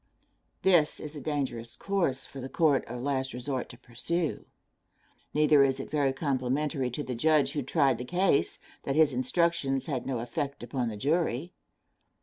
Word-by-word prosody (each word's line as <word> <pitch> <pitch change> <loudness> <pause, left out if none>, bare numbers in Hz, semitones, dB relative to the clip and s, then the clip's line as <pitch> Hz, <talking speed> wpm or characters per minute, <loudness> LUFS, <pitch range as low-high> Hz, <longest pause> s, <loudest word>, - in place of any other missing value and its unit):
This 175 -5 +4
is 150 0 -7
a 145 - -6
dangerous 130 -7 -3
course 175 -10 -1
for 135 - -9
the 130 - -6
court 150 -3 +3
of 120 +1 -6
last 135 -1 -1
resort 130 +1 -3
to - - -10
pursue; 160 +7 -3 0.8
neither 150 -1 +5
is 135 0 +1
it - - -6
very 145 -3 +2
complimentary 135 0 -1
to 135 +5 -4
the 130 - -4
judge 145 +2 +3
who 145 - -1
tried 135 -2 +2
the - - -3
case, 180 +3 +2 0.2
that 135 - -2
his 155 -3 +5
instructions 135 +1 +1
had 135 -5 -3
no 130 -2 -1
effect 135 +4 -4
upon 120 0 -2
the 105 - -6
jury. 160 - 0
140 Hz, 165 wpm, -29 LUFS, 130-155 Hz, 0.8 s, neither